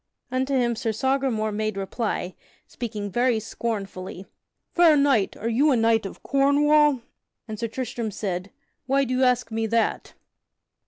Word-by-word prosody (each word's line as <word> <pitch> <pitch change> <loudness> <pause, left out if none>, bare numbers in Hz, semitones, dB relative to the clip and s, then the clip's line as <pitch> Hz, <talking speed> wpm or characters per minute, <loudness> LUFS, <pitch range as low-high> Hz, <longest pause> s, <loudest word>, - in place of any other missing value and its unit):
Unto 260 +2 0
him 240 -2 +1
Sir 225 0 -1
Sagramore 255 -2 0
made 215 -1 -2
reply, 195 -2 -3 0.3
speaking 210 -4 -5
very 240 +2 +2
scornfully: 195 -4 -5 0.5
"Fair 335 -3 +6
knight, 275 -8 +2
are 220 - -4
you 255 +7 +3
a 270 - +4
knight 225 -2 +2
of - - -12
Cornwall?" 285 0 +3 0.5
and 215 -2 -6
Sir 230 - -1
Tristram 235 -1 -4
said: 190 -2 -4 0.4
"Why 275 +1 +3
do 255 -1 -2
you 260 - +2
ask 250 -2 +2
me 225 0 -1
that?" 230 +1 -1
230 Hz, 150 wpm, -24 LUFS, 215-265 Hz, 0.5 s, Fair